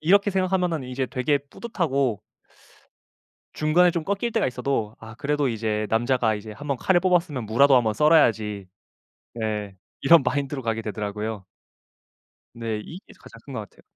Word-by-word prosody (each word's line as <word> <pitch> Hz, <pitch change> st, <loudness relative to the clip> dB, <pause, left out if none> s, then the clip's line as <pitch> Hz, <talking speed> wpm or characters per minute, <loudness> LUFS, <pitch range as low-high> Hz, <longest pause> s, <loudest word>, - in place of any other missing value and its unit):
이렇게 200 Hz, +5 st, +4 dB
생각하면은 180 Hz, -6 st, 0 dB
이제 130 Hz, +1 st, -3 dB
되게 140 Hz, +3 st, 0 dB
뿌듯하고 140 Hz, -, -2 dB, 1.3 s
중간에 170 Hz, +4 st, +3 dB
좀 165 Hz, -2 st, -2 dB
꺾일 200 Hz, +5 st, -1 dB
때가 -, -, +1 dB
있어도 125 Hz, -4 st, -2 dB
아 110 Hz, 0 st, -11 dB
그래도 145 Hz, +1 st, 0 dB
이제 110 Hz, -1 st, -1 dB
"남자가 115 Hz, -1 st, +1 dB
이제 105 Hz, +1 st, -8 dB
1 145 Hz, +8 st, -10 dB
번 140 Hz, -2 st, 0 dB
칼을 180 Hz, +5 st, +3 dB
뽑았으면 170 Hz, -9 st, +1 dB
무라도 135 Hz, +6 st, +5 dB
1 125 Hz, -, +4 dB
번 110 Hz, -1 st, 0 dB
썰어야지." 110 Hz, -, +3 dB, 0.7 s
네 105 Hz, -3 st, -3 dB, 0.3 s
이런 160 Hz, 0 st, +6 dB
마인드로 140 Hz, +1 st, -2 dB
가게 115 Hz, -1 st, -2 dB
되더라고요. 105 Hz, -1 st, -4 dB, 1.1 s
네. 115 Hz, -2 st, -4 dB
이게 180 Hz, +4 st, -11 dB
가장 -, -, -14 dB
큰 -, -, -9 dB
것 -, -, -3 dB
같아요. -, -, -15 dB
130 Hz, 330 characters per minute, -24 LUFS, 110-160 Hz, 1.3 s, 이런